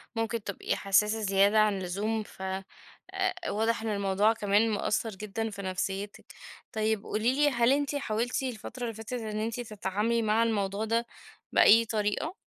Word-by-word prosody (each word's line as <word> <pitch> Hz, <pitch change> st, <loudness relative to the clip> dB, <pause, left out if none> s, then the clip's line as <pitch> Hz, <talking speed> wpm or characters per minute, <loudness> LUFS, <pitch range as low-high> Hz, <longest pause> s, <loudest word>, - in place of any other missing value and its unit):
ممكن 225 Hz, -1 st, -2 dB
تبقي 200 Hz, -, -2 dB
حساسة 210 Hz, +2 st, +2 dB
زيادة 200 Hz, +1 st, +4 dB
عن 210 Hz, -2 st, +3 dB
اللزوم، 205 Hz, +4 st, -2 dB
فواضح 225 Hz, -, -3 dB
إن 225 Hz, -, -3 dB
الموضوع 200 Hz, +1 st, +2 dB
كمان 210 Hz, +1 st, +2 dB
مأثر 215 Hz, +1 st, 0 dB
جدًا 215 Hz, +2 st, -4 dB
في 200 Hz, -2 st, -7 dB
نفسيتِك. 195 Hz, +2 st, -4 dB, 0.5 s
طيب 220 Hz, -1 st, 0 dB
قولي 220 Hz, +4 st, 0 dB
لي 295 Hz, +1 st, +4 dB
هل 240 Hz, -2 st, +3 dB
أنتِ 285 Hz, +1 st, +1 dB
حاولتِ 240 Hz, -1 st, -1 dB
الفترة 245 Hz, 0 st, -5 dB
اللي 230 Hz, -1 st, -2 dB
فاتت 225 Hz, +3 st, -8 dB
إن 220 Hz, -3 st, -3 dB
أنتِ 225 Hz, +2 st, -2 dB
تتعاملي 215 Hz, 0 st, -1 dB
مع 220 Hz, +1 st, +2 dB
الموضوع 205 Hz, -2 st, -1 dB
ده 230 Hz, +1 st, 0 dB, 0.5 s
بأي 230 Hz, +2 st, +6 dB
طريقة؟ 215 Hz, -, -1 dB
215 Hz, 150 wpm, -29 LUFS, 200-230 Hz, 0.5 s, بأي